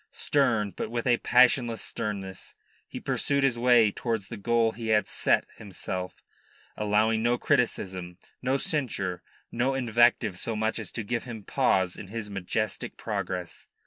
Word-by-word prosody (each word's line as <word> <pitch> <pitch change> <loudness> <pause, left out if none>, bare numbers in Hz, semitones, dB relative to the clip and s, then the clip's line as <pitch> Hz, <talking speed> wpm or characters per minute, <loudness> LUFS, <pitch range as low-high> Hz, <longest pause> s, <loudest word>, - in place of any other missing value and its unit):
Stern, 115 -8 +1
but - - -4
with 120 0 -3
a 120 -2 +4
passionless 125 -2 +4
sternness, 100 -4 -5 0.3
he - - -7
pursued 140 -1 0
his 125 -3 +2
way 120 -3 +5
towards 110 -3 -3
the 115 - -5
goal 115 +2 +2
he 115 0 -7
had 110 -1 +3
set - - +2
himself, 95 -2 -6 0.5
allowing 105 +1 +2
no 120 +1 +2
criticism, 95 - -1 0.2
no 130 +2 +1
censure, 100 - -1 0.3
no 130 +3 0
invective 120 -5 +2
so 115 - -2
much 110 +1 -1
as - - -4
to 115 - -3
give 120 +3 -2
him 115 -4 -7
pause 95 -1 +1
in 100 - -8
his 105 0 -6
majestic 100 +2 -3
progress. 90 -2 -4
115 Hz, 150 wpm, -27 LUFS, 100-120 Hz, 0.5 s, way